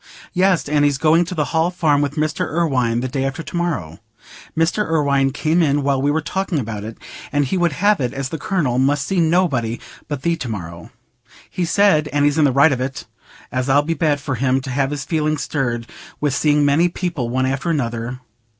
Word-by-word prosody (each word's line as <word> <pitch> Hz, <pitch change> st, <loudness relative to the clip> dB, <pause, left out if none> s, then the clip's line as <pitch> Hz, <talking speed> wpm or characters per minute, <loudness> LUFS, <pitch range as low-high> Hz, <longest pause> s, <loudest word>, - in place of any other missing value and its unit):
"Yes, 185 Hz, -3 st, +2 dB
and 145 Hz, 0 st, +2 dB
he's 145 Hz, -2 st, +2 dB
going 160 Hz, +4 st, +3 dB
to 180 Hz, -, -6 dB
the 150 Hz, -2 st, 0 dB
Hall 160 Hz, +1 st, +2 dB
Farm 160 Hz, -5 st, +1 dB
with 145 Hz, 0 st, -2 dB
Mr. 155 Hz, -1 st, -1 dB
Irwine 130 Hz, -8 st, +1 dB
the 130 Hz, -, -2 dB
day 135 Hz, +1 st, -2 dB
after 135 Hz, +4 st, -3 dB
to -, -, -8 dB
morrow. 140 Hz, -, -2 dB, 0.6 s
Mr. 165 Hz, +6 st, +2 dB
Irwine 140 Hz, -5 st, +1 dB
came 160 Hz, +4 st, +1 dB
in 145 Hz, -2 st, +2 dB
while 135 Hz, -1 st, +1 dB
we 140 Hz, -, +1 dB
were 155 Hz, +2 st, +1 dB
talking 190 Hz, 0 st, -2 dB
about 110 Hz, -5 st, -4 dB
it, 110 Hz, +1 st, -7 dB, 0.3 s
and 145 Hz, 0 st, +1 dB
he 135 Hz, -, -2 dB
would 175 Hz, -4 st, +1 dB
have 205 Hz, +6 st, +2 dB
it 125 Hz, -, -1 dB
as 135 Hz, -2 st, -4 dB
the 160 Hz, -, -5 dB
Colonel 150 Hz, -8 st, 0 dB
must 140 Hz, +2 st, +2 dB
see 190 Hz, -2 st, 0 dB
nobody 160 Hz, -9 st, +1 dB, 0.3 s
but 145 Hz, -3 st, -5 dB
thee 170 Hz, 0 st, +1 dB
to 125 Hz, -, -5 dB
morrow. 85 Hz, -5 st, -7 dB, 0.6 s
He 180 Hz, -, -1 dB
said—and 155 Hz, -7 st, +2 dB
he's 145 Hz, +2 st, +2 dB
in 150 Hz, -, +5 dB
the 140 Hz, -, +3 dB
right 140 Hz, +4 st, +5 dB
of 125 Hz, -2 st, -1 dB
it—as 130 Hz, 0 st, -6 dB
it'll 145 Hz, +2 st, +4 dB
be 165 Hz, +2 st, -1 dB
bad 150 Hz, -2 st, +1 dB
for 140 Hz, 0 st, -3 dB
him 130 Hz, +1 st, +1 dB
t' 130 Hz, 0 st, -6 dB
have 135 Hz, +1 st, 0 dB
his 140 Hz, -2 st, -4 dB
feelings 155 Hz, -2 st, 0 dB
stirred 120 Hz, -5 st, -2 dB, 0.3 s
with 145 Hz, -3 st, 0 dB
seeing 150 Hz, 0 st, +2 dB
many 155 Hz, +5 st, +3 dB
people 170 Hz, -9 st, -3 dB
one 130 Hz, +2 st, 0 dB
after 135 Hz, +5 st, -1 dB
another. 120 Hz, -4 st, -2 dB
145 Hz, 215 wpm, -20 LUFS, 130-165 Hz, 0.6 s, in